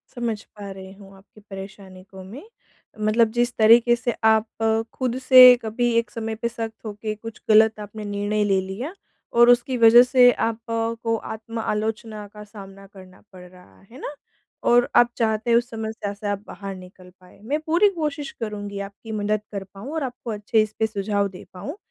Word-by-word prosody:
समझ 230 -3 -3
पा 205 -1 -11
रही 190 0 -10
हूँ 195 -1 -16
आपकी 205 +2 -20
परेशानी 195 -1 -10
को 190 -1 -11
मैं। 230 - -10 0.6
मतलब 220 +1 +3
जिस 240 +1 0
तरीक़े 235 +2 +6
से 240 -1 -3 0.2
आप 220 0 +2 0.5
खुद 255 -1 -2
से 255 -1 +9
कभी 235 +2 -1
एक 230 - 0
समय 225 -1 -4
पे 235 +2 -3
सख्त 225 -1 -7
होके, 215 0 -5
कुछ 225 +1 -10
गलत 220 0 +5
आपने 210 +1 -8
निर्णय 205 +1 -1
ले 195 -2 +2
लिया, 220 - -6 0.4
और 240 +1 +6
उसकी 245 +1 +3
वजह 230 +1 +8
से 250 -1 +5 0.2
आपको 230 0 -2
आत्म-आलोचना 220 -1 -4
का 210 0 -10
सामना 195 -2 -13
करना 185 -1 -15
पड़ 180 -1 -12
रहा 180 0 -20
है 255 - -12
ना? 295 - -6 0.5
और 245 0 +3
आप 240 0 +6
चाहते 220 0 0
हैं 235 - +5
उस 240 +1 -1
समस्या 220 -2 -5
से 205 +1 -7
आप 205 0 -3
बाहर 195 -1 -7
निकल 185 0 -14
पाएँ, 180 +2 -19
मैं 285 +8 -2
पूरी 350 +6 +4
कोशिश 305 -5 -4
करूँगी 205 -2 -5
आपकी 215 +3 -12
मदद 210 0 -1
कर 200 -1 -5
पाऊँ 215 +9 -9
और 315 - -2
आपको 245 -3 -6
अच्छे 215 +1 +1
इस 215 0 -3
पे 220 - +2
सुझाव 200 -1 -1
दे 185 - -12
पाऊँ, 260 - -7
220 Hz, 185 wpm, -23 LUFS, 205-240 Hz, 0.6 s, से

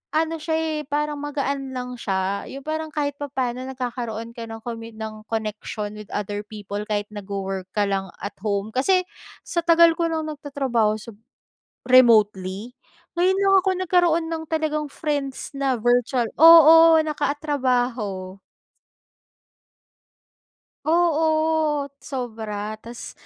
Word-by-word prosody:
ano 325 0 0
siya 320 +1 -2
eh, 320 -1 -1
parang 295 0 -1
magaan 280 -2 -3
lang 250 -1 -5
siya. 195 -1 -2
'Yong 275 0 -8
parang 315 +1 -3
kahit 285 -1 -2
papano 260 -3 -3
nagkakaroon 240 -3 -5
ka 230 -1 -8
ng 225 0 -9
komit 230 -1 -7
ng 215 -1 -8
connection 215 -1 -4
with 210 - -10
other 205 0 -3
people 205 -1 -6
kahit 205 -1 -2
nagwo-work 195 -2 -5
ka 210 - +2
lang 195 -1 -1 0.2
at 200 - -6
home. 205 +1 -2
Kasi 365 - +2 0.4
sa 340 - -2
tagal 335 0 +6
ko 335 - +2
ng 320 -1 -2
nagtatrabaho 270 -7 0
sa 220 +2 -9 0.7
remotely, 215 -3 +4 0.4
ngayon 375 +2 +3
lang 390 0 +5
ako 380 +1 0
nagkaroon 350 -2 +2
ng 320 -1 -3
talagang 305 -2 -1
friends 285 -2 -4
na 270 -2 +1
virtual, 240 +1 +1
oo, 325 0 +9
nakatrabaho. 250 -10 -1 2.5
Oo, 315 -3 +2
sobra 220 -4 -5
ta's 235 +2 -9
255 Hz, 125 wpm, -23 LUFS, 215-310 Hz, 2.5 s, oo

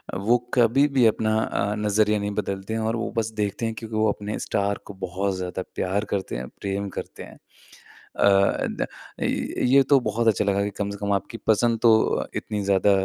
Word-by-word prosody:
वो 105 +6 +3 0.2
कभी 125 +4 +4
भी 125 - +6
अपना 110 0 +2
अ, 105 -1 -1
नज़रिया 105 0 +2
नहीं 100 0 -2
बदलते 100 +2 -5
हैं। 115 - -1
और 115 - -1
वो 115 0 -3
बस 115 0 0
देखते 105 +2 -2
हैं 115 - -1
क्योंकि 110 -1 -7
वो 110 0 +3
अपने 105 +1 -5
स्टार 100 0 -1
को 100 - -9
बहुत 95 +2 -2
ज़्यादा 90 0 -4
प्यार 100 +3 -1
करते 95 -9 -2
हैं, 65 +1 -4
प्रेम 100 0 -2
करते - - -6
हैं। - - -13
अ, - - -33 1.3
द - - -5 0.4
अ, - - -2
ये 135 +2 +2
तो 140 -2 +6
बहुत 115 0 -1
अच्छा 105 -2 +3
लगा 100 0 +1
कि 105 - -1
कम 100 -1 -2
से 100 - -6
कम 100 0 -2
आपकी 100 +4 -3
पसंद 115 +1 +3
तो 115 - +6 0.4
इतनी 105 -1 -3
ज़्यादा 100 +1 +3
105 Hz, 200 wpm, -24 LUFS, 100-115 Hz, 1.3 s, भी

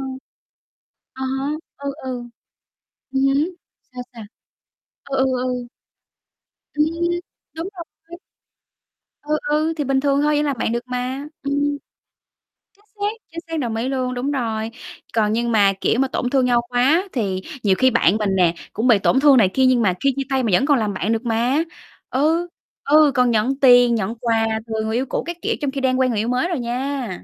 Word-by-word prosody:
hông? 265 -1 -5 0.9
À 265 - -8 0.2
há. 270 - -2 0.3
Ừ, 280 0 -4
ừ. 260 - -4 1.0
Ừm 265 0 0
hứm. 280 +6 +2 0.4
Sao, 250 0 -6
sao? 230 -2 -9 0.8
Ừ, 275 - -3
ừ, 265 - +3 0.2
ừ. 250 -1 -3 1.1
Ừm, 300 0 +3 0.7
đúng 330 +4 -4
rồi. 335 0 -11 1.0
Ừ, 300 +1 0
ừ. 310 +2 +1
Thì 295 - -1
bình 270 0 +1
thường 280 0 +2
thôi, 300 0 +2
vẫn 295 - +1
làm 275 -5 -2
bạn 225 - -1
được 235 0 -2
mà. 250 +3 -3 0.2
Ừm. 280 0 -2 1.2
Chính 415 - -30
xác, 410 +1 0 0.2
chính 335 - -6
xác, 325 -1 -3
đồng 235 -5 -2
ý 230 +3 -2
luôn, 255 -1 -1
đúng 250 +3 -2
rồi. 225 -4 -2 0.4
Còn 215 -1 +2
nhưng 235 +1 0
mà, 200 -3 +4
kiểu, 235 - +1
mà 270 - +2
tổn 250 -1 -2
thương 265 -1 +2
nhau 240 -1 +3
quá 260 +8 +3
thì 195 -7 -1 0.2
nhiều 195 -3 +3
khi 260 0 +4
bạn 215 -4 +3
mình 205 -3 0
nè, 175 -3 +3 0.2
cũng 225 +4 0
bị 225 -5 +5
tổn 265 - +3
thương 280 -1 +6
này 205 -6 +5
kia, 265 - +3
nhưng 255 -2 +4
mà 190 -5 +2
khi 275 -1 +3
chia 275 - -1
tay 265 -1 +1
mà 230 - 0
vẫn 255 - +4
còn 285 -4 +3
làm 210 -2 -1
bạn 195 +4 -1
được 225 +2 -3
mà. 240 +7 +1 0.5
Ừ, 320 +6 +1 0.4
ừ. 300 -1 +6
Còn 250 -2 +3
nhận 240 +5 +1
tiền, 245 -3 +6
nhận 220 +1 -2
quà 225 -1 0 0.2
từ 220 -1 -2
người 220 +1 -2
yêu 255 +3 0
cũ - - -2
các 345 0 -5
kiểu - - 0
trong 280 - -1
khi 275 0 -4
đang 260 -1 +1
quen 260 -1 +3
người 215 - -1
yêu 220 - -1
mới 250 +7 +1
rồi 345 -6 -2
nha. 250 +1 -3
255 Hz, 200 wpm, -21 LUFS, 230-280 Hz, 1.2 s, thương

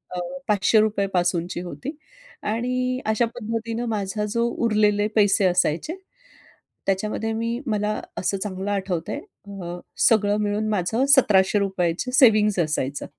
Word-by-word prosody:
अ, 180 - -2 0.3
₹500 210 0 +2
पासूनची 175 -1 0
होती. 255 - -7 0.5
आणि 250 +3 -1
अशा 220 +2 +2
पद्धतीने 230 +1 -3
माझा 205 +1 -2
जो 235 0 +1 0.2
उरलेले 210 -1 +2
पैसे 205 -2 +4
असायचे, 180 - +1 0.9
त्याच्यामध्ये 215 +3 -1
मी 230 +2 -2
मला 210 -1 -1 0.2
असं 195 +1 -1
चांगलं 195 0 -4
आठवत 190 -4 -2
आहे - - -3
अ, 180 -4 -9 0.2
सगळं 210 -2 +3
मिळून 210 +1 -1
माझं 210 +6 0
₹1700 195 - +3
ची 250 - -3
सेव्हिंग्ज 215 -7 +5
असायचं. 145 -3 -2
210 Hz, 125 wpm, -23 LUFS, 190-225 Hz, 0.9 s, सेव्हिंग्ज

